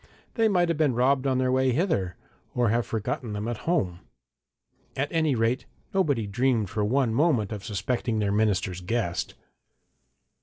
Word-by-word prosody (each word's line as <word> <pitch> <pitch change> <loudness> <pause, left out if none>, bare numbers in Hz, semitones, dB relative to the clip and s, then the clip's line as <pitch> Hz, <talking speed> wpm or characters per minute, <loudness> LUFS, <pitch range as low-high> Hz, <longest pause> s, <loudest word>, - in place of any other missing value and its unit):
they 225 -2 +3
might 180 -4 +3
have 165 -2 -1
been 145 -6 +3
robbed 130 +2 +2
on 130 -1 +2
their 130 0 +1
way 130 0 +3
hither, 125 - 0 0.4
or 120 -2 +2
have 115 +2 +1
forgotten 110 +1 -3
them 105 +2 -3
at 120 +5 -4
home. 90 - 0 1.0
At 140 +2 -1
any 160 -4 +2
rate, 115 +2 0 0.3
nobody 145 - +1
dreamed 115 -1 0
for 105 0 -1
one 120 +2 +1
moment 125 -7 +2
of 105 -3 -5
suspecting 110 +3 -2
their 105 -2 +1
minister's 100 -3 0
guest. 95 -2 -2
120 Hz, 160 wpm, -26 LUFS, 105-140 Hz, 1.0 s, they